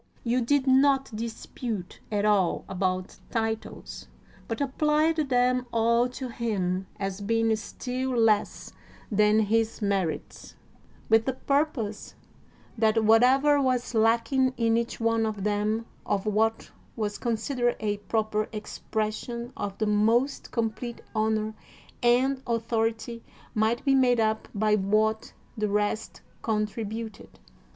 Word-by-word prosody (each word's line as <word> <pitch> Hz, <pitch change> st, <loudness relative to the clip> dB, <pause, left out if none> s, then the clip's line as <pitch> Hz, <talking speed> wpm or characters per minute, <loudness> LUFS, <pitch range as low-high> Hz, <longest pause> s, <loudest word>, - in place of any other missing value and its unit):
You 245 Hz, +1 st, +1 dB
did 270 Hz, +3 st, +2 dB
not 270 Hz, -2 st, +3 dB
dispute 225 Hz, -2 st, -5 dB
at 205 Hz, -1 st, +1 dB
all 200 Hz, -5 st, +2 dB
about 185 Hz, 0 st, -2 dB
titles, 225 Hz, -1 st, -4 dB, 0.4 s
but 225 Hz, -, -3 dB
applied 300 Hz, +3 st, +2 dB
them 250 Hz, 0 st, +2 dB
all 235 Hz, +2 st, +3 dB
to 255 Hz, +1 st, -6 dB
him 190 Hz, -6 st, -2 dB
as 195 Hz, 0 st, -3 dB
being 225 Hz, +2 st, +2 dB
still 250 Hz, +3 st, -3 dB
less 220 Hz, -2 st, +1 dB, 0.4 s
than 210 Hz, +1 st, +4 dB
his 225 Hz, +1 st, +1 dB
merits, 195 Hz, -6 st, -2 dB, 0.5 s
with 225 Hz, 0 st, +4 dB
the 265 Hz, -, 0 dB
purpose 270 Hz, -6 st, -1 dB, 0.6 s
that 220 Hz, 0 st, +3 dB
whatever 260 Hz, +6 st, +5 dB
was 255 Hz, -2 st, 0 dB
lacking 235 Hz, +4 st, +2 dB
in 230 Hz, -1 st, +2 dB
each 235 Hz, 0 st, -2 dB
one 230 Hz, 0 st, +2 dB
of 215 Hz, -3 st, -2 dB
them 210 Hz, +2 st, 0 dB, 0.2 s
of 200 Hz, 0 st, -1 dB
what 220 Hz, +1 st, 0 dB, 0.2 s
was 210 Hz, -2 st, -3 dB
considered 240 Hz, +1 st, 0 dB
a 205 Hz, -1 st, -1 dB
proper 215 Hz, 0 st, -1 dB
expression 220 Hz, +2 st, -4 dB
of 200 Hz, -1 st, -4 dB
the 215 Hz, -, 0 dB
most 225 Hz, +6 st, +2 dB
complete 230 Hz, +1 st, -3 dB
honor 220 Hz, 0 st, 0 dB, 0.5 s
and 260 Hz, +2 st, +3 dB
authority 230 Hz, 0 st, -1 dB, 0.3 s
might 220 Hz, +3 st, +1 dB
be 275 Hz, -, +4 dB
made 250 Hz, -3 st, +4 dB
up 220 Hz, 0 st, 0 dB
by 215 Hz, +1 st, +2 dB
what 215 Hz, +2 st, +1 dB, 0.2 s
the 215 Hz, -1 st, -1 dB
rest 210 Hz, +2 st, -1 dB, 0.2 s
contributed. 220 Hz, 0 st, -3 dB
225 Hz, 120 wpm, -27 LUFS, 215-245 Hz, 0.6 s, whatever